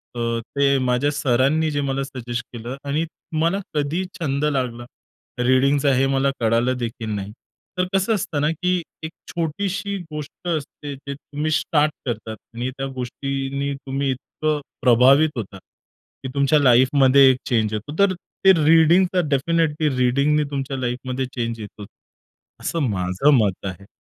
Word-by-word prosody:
अ, - - -4 0.2
ते 140 +4 +1
माझ्या 125 +4 +1
सरांनी 140 +2 +2
जे 145 -1 -1
मला 135 0 -1
सजेस्ट 125 -2 -5
केलं 120 +3 -6
आणि 150 +4 0 0.4
मला 170 +4 +2
कधी 150 +4 -1 0.2
छंद 140 -3 -1
लागला, 125 -5 -1 0.5
रीडिंगचा, 135 +3 +3
हे 135 +1 +3
मला 135 +1 +2
कळालं 115 +3 +1
देखील 115 -2 -4
नाही. 100 0 -5 0.5
तर 180 - +2
कसं 195 +4 +2
असतं 165 -6 -2
ना 150 - +2
की 180 +2 0 0.2
1 160 - -5 0.2
छोटीशी 195 +4 -2
गोष्ट 150 +3 -8
असते 145 -2 -4
जे 140 +1 -7
तुम्ही 145 +2 -4
स्टार्ट 155 -1 +2
करतात 110 -2 -4 0.2
आणि 120 +2 -2
त्या 135 - -3
गोष्टींनी 135 +2 -3
तुम्ही 135 0 -3
इतकं 150 +4 -2 0.2
प्रभावित 130 +6 +5
होता 100 -3 -5
की 130 +6 -15
तुमच्या 140 +2 +3
लाईफमध्ये 130 +1 +5
चेंज 110 -3 +1
होतो. 110 +8 -5
तर 200 -1 +4
ते 190 +2 +2
रीडिंगचा 170 +4 +5
डेफिनिटली 155 +1 +1
रीडिंगनी 140 +4 +2
तुमच्या 135 -1 -3
लाईफमध्ये 130 +1 -3
चेंज 115 -2 -3
येतो. 105 -1 -9 0.8
असं 165 - -2
माझं 95 +6 +1
मत 100 -4 0
आहे. 100 +1 -7
140 Hz, 140 wpm, -22 LUFS, 125-150 Hz, 0.8 s, प्रभावित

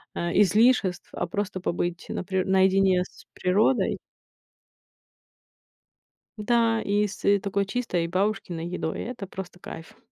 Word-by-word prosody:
а 170 0 -2
излишеств, 210 -2 +3
а - - -2
просто 200 -2 -3
побыть 175 -1 -2
на - - -4
при 190 +1 0
наедине 190 -1 +3
с - - -17
природой. 205 +8 +2 2.4
Да, 225 +1 +2
и 205 +1 +1
с, 200 - -10
э, 200 0 +4
такой 200 +1 -1
чистой 195 -7 -1
бабушкиной 185 -2 -1
едой- 175 -2 -3
это 230 -4 -6
просто 185 -1 -8
кайф. 165 -2 -10
190 Hz, 125 wpm, -26 LUFS, 180-210 Hz, 2.4 s, э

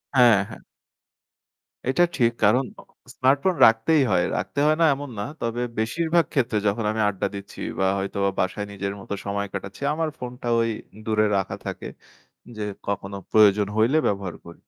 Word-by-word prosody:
হ্যাঁ, 120 -5 +7
হ্যাঁ। - - -11 1.3
এটা 175 +6 +3
ঠিক 120 -2 +3
কারণ 115 +6 +4 0.5
স্মার্টফোন 140 +7 +2
রাখতেই 125 +7 +4
হয়। 85 - +3
রাখতে 140 - -3
হয় 155 0 +3
না - - +6
এমন 145 -1 -7
না। 100 - -1 0.2
তবে 115 +1 -2 0.2
বেশিরভাগ 165 +9 +1
ক্ষেত্রে 120 -6 +1
যখন 105 +2 0
আমি 110 0 -1
আড্ডা 100 0 -2
দিচ্ছি 100 0 -9 0.2
বা 95 - +2
হয়তো 100 +1 -4 0.2
বাসায় 100 +2 -1
নিজের 100 0 -4
মতো 100 - -6
সময় 100 0 -2
কাটাচ্ছি 100 +5 -7
আমার 160 0 -1
ফোনটা 125 -1 -7
ঐ - - +3 0.5
দূরে 110 -1 +2
রাখা 95 - -2
থাকে - - -5 0.7
যে 105 - -3 0.2
কখনো 100 0 -3
প্রয়োজন 105 -1 +5
হইলে 115 +8 +3
ব্যবহার 100 -3 -2
করি। 85 - -11
110 Hz, 160 wpm, -24 LUFS, 100-130 Hz, 1.3 s, হ্যাঁ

